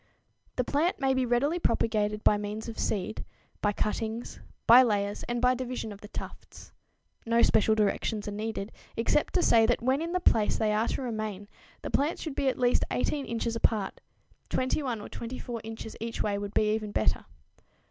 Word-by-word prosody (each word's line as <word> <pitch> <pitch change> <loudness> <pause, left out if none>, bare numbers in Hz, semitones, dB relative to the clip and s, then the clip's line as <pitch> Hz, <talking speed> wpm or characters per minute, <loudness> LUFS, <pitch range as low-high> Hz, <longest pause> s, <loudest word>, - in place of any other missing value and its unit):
_ - - -48
The 250 - +1
plant 300 +8 0
may 270 -1 +2
be 260 -1 +1
readily 280 +8 +2
propagated 215 -6 +1
by - - +5
means 210 +2 -4
of 230 - -6
seed, 210 +1 -2 0.4
by 205 - +2
cuttings, 220 +2 -3 0.3
by 240 +3 +9
layers, 205 -4 0
and 240 0 0
by 250 +1 +4
division 250 -3 -4
of 205 0 -10
the 210 - -9
tufts. - - -9 0.5
No 230 0 +3
special 220 0 +4
directions 210 0 0
are - - -2
needed, 215 0 -4 0.3
except 235 +6 +1
to 360 - +3
say 225 -1 +5
that 240 0 +1
when 260 +4 +2
in 335 +1 -3
the 365 - +1
place 220 -11 +3
they 215 -1 +1
are 220 +2 +1
to - - -2
remain 215 -4 -4 0.4
the - - -4
plants 295 +4 0
should 310 - -4
be 275 - -1
at 260 - +1
least 245 -1 +3
18 280 +2 -1
inches 230 0 -2
apart 220 -3 0 0.5
21 255 -3 -1
or - - -7
24 235 -1 -6
inches 225 0 -7
each 230 +1 -3
way 205 -1 0
would 200 0 -5
be 215 0 +3
even 215 -1 -3
better. - - +1
230 Hz, 190 wpm, -29 LUFS, 210-255 Hz, 0.5 s, by